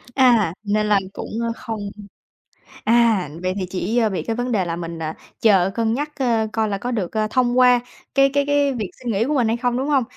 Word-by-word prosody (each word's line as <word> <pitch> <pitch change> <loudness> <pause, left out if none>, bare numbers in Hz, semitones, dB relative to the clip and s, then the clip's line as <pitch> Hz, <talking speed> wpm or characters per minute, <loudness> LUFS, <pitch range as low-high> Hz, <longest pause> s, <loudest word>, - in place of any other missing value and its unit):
À, 235 -10 +4
nên 210 0 +1
là 205 -2 +3
cũng, - - -7 0.2
a, - - -1
không 215 -4 -5 0.9
à, 225 -7 +3
vậy 185 0 -1
thì 185 - -2
chỉ, 195 +5 -2
ơ, 225 -3 +3
bị 190 - -3
cái 225 - -2
vấn 245 +1 -2
đề 200 -5 +1
là 165 -1 -2
mình, 170 -1 -6
à, 160 0 -4 0.3
chờ 195 -4 +4
cân 225 -1 +1
nhắc, 295 +4 -2
ơ, 230 -4 +1
coi 220 -1 +1
là 200 - -1
có 240 +5 -4
được, 205 -8 -2
ờ, 215 -1 0
thông 250 0 +2
qua 250 -1 +6 0.4
cái 275 0 +5
cái 285 0 +2
cái 285 -1 +2
việc 215 -6 -4
xin 245 -2 -3
nghỉ 205 +3 +1
của 295 +5 -1
mình 245 -5 +2
hay 230 +2 0
không, 245 0 0
đúng 265 +3 -1
hông? 275 -3 +3
225 Hz, 240 wpm, -21 LUFS, 200-250 Hz, 0.9 s, qua